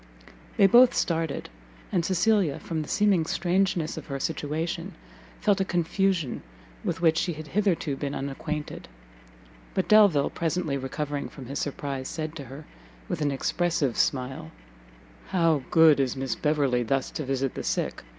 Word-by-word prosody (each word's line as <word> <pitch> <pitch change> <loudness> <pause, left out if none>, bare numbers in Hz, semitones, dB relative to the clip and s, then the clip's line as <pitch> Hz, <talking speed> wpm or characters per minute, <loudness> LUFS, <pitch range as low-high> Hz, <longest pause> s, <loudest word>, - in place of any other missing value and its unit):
They 200 - +6
both 240 +6 +7
started, 165 -3 -1 0.4
and 175 - +1
Cecilia, 185 -3 +2
from 160 -2 -4
the 150 - -6
seeming 205 -5 +3
strangeness 175 -2 0
of - - -7
her 140 -2 -4
situation, 165 +5 -3 0.4
felt 205 -2 +2
a - - +4
confusion 175 -4 0 0.4
with - - -2
which 160 -1 +4
she 175 - -1
had 155 -1 -9
hitherto 175 -7 0
been 140 +1 -4
unacquainted. 150 +2 -5 0.9
But - - 0
Delvile, 200 -10 +5
presently 165 -3 -1
recovering 140 +2 -3
from 135 - -10
his 140 +3 -4
surprise, 140 -2 -4
said 155 -1 -5
to 140 - -7
her, 135 +5 -10 0.4
with - - -3
an 145 - +2
expressive 145 -1 0
smile, 130 - -1 0.8
"How 165 -5 +2
good 160 -4 +6
is 135 -1 0
Miss 130 -3 -1
Beverley 140 -2 +1
thus 135 +3 -1
to 155 - -4
visit 135 -1 -1
the - - -5
sick! - - -2
155 Hz, 150 wpm, -26 LUFS, 140-175 Hz, 0.9 s, both